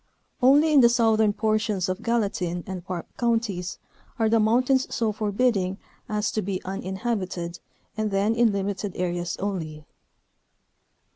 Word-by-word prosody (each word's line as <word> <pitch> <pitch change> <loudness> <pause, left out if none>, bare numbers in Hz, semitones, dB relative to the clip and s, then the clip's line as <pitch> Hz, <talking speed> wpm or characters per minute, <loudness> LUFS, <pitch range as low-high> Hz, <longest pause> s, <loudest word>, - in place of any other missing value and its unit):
Only 290 +5 +5
in 290 - +7
the 235 - +7
southern 220 -3 +3
portions 215 -3 0
of 185 +3 -3
Gallatin 200 -7 -1
and 185 -2 -6
Park 180 -2 -5
Counties 225 -7 -1 0.4
are 225 -2 +2
the 225 0 +4
mountains 255 +5 +3
so 225 -2 0
forbidding 205 -2 0 0.3
as 210 0 0
to 215 - -1
be 190 -1 -3
uninhab 190 +4 -2
ited, 175 -2 -6 0.4
and 215 0 -1
then 200 +2 +1
in 230 -1 +3
limited 200 0 -3
areas 175 -1 -2
only. 160 -6 -4
205 Hz, 140 wpm, -25 LUFS, 185-230 Hz, 0.4 s, in